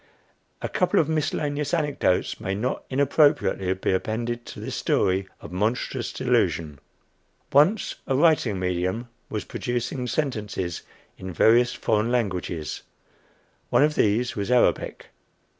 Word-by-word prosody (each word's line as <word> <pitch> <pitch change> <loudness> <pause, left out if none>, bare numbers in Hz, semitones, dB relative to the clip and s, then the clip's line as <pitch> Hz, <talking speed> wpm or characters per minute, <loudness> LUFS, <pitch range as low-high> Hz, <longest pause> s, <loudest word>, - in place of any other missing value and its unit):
A - - 0
couple 180 - +2
of 155 - +2
miscellaneous 150 -1 -1
anecdotes 145 - 0
may 95 +1 -2
not 120 +6 -2
inappropriately 140 - +2
be 95 - -1
appended 120 +5 -2
to - - -8
this - - -5
story 95 +1 +1
of 80 - -10
monstrous 105 +7 -1
delusion. 75 -4 0 0.7
Once 180 +10 +4
a 135 - +1
"writing 140 - +3
medium" 95 +6 -2 0.2
was 105 - -4
producing 125 +1 -3
sentences 105 - -2 0.4
in 95 0 -6
various 120 +8 +4
foreign 110 +1 0
languages. 90 -9 -2 0.9
One - - +4
of 150 0 +3
these 115 0 +1
was 100 +1 -3
Arabic. 125 -1 +1
120 Hz, 125 wpm, -25 LUFS, 95-140 Hz, 0.9 s, Once